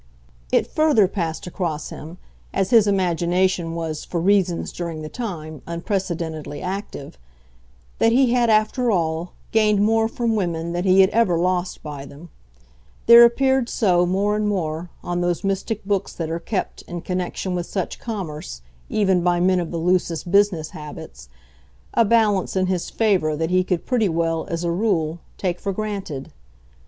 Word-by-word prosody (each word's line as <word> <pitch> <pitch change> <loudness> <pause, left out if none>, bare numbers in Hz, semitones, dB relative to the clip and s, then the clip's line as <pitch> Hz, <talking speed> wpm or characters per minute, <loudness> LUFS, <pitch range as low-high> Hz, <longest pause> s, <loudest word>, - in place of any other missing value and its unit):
It - - +3
further 295 -11 +3
passed 170 -4 -3
across 170 -4 -3
him, 160 +4 -9 0.4
as 195 -1 0
his 225 -4 +6
imagination 180 -2 +1
was, 160 -2 -4
for 175 - -3
reasons, 185 -1 +1
during 165 -3 -5
the 155 - -6
time, 155 - -6
unprecedentedly 170 -4 -3
active, 185 - -6 0.8
that 225 - +4
he 250 0 +4
had, 240 -2 +3
after 220 +3 +2
all, 165 -3 -1 0.2
gained 215 -2 +3
more 225 +1 +3
from 230 0 -1
women 170 -4 -2
than 175 +2 -2
he 190 0 +6
had 190 - +4
ever 210 -6 +2
lost 180 +1 -1
by 145 -2 -7
them; 145 +5 -13 0.8
there 235 +1 +10
appeared 265 +1 +3
so, 180 -5 +2
more 200 +3 +1
and 210 0 0
more, 170 -4 -2
on 175 0 -2
those 175 -1 -1
mystic 195 +2 -2
books 200 -1 -1
that 160 -2 -4
are 165 - -2
kept, 190 +3 -3
in 175 -1 -5
connection 185 +1 -3
with 175 -1 -3
such 190 -3 -4
commerce, 155 - -6 0.3
even 190 -4 +2
by 175 0 +2
men 185 +1 +3
of 170 -2 -3
the 170 - -4
loosest 175 0 0
business 200 -6 +2
habits, 155 +1 -10 0.6
a 230 - +4
balance 210 -4 +2
in 185 0 +2
his 185 -2 -2
favour 190 -9 +1
that 160 +2 -2
he 185 0 +3
could 180 -2 -2
pretty 225 -6 +1
well, 165 -1 -1
as 170 -1 -3
a 170 - 0
rule, 170 -4 0 0.2
take 180 -2 -2
for 200 - -2
granted. 195 -9 -5
180 Hz, 165 wpm, -22 LUFS, 165-205 Hz, 0.8 s, there